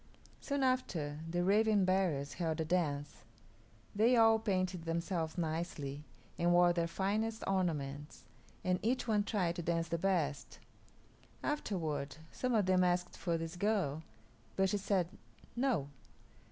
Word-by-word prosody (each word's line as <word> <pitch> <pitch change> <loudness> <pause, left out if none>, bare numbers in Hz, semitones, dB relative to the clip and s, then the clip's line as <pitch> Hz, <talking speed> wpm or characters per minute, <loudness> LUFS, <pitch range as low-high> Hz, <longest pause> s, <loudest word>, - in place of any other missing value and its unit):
Soon 280 -1 -1
after, 170 - 0
the 175 +1 0
Raven 205 +1 +4
Bearers 180 -7 +1
held 165 -3 -2
a 160 - 0
dance. 145 -9 -1 0.7
They 230 +5 +4
all 225 -1 +6
painted 185 -4 -1
themselves 165 0 -2
nicely 155 -3 -3 0.3
and 175 +1 +3
wore 175 0 +5
their 170 -1 0
finest 215 +5 -1
ornaments 150 -6 -2 0.4
and 180 0 +1
each 245 +3 0
one 210 -2 +2
tried 180 -6 -1
to - - -2
dance 165 0 -1
the 170 - -1
best. 160 -7 -1 0.9
Afterward 160 - -2 0.2
some 255 -2 -1
of 210 -3 +3
them 185 -1 +4
asked 180 0 0
for 170 -3 -1
this 165 0 -5
girl, 180 -7 0 0.5
but 190 0 +2
she 205 - +1
said, 195 -3 +1 0.5
"No." 235 - 0
180 Hz, 140 wpm, -34 LUFS, 160-205 Hz, 0.9 s, all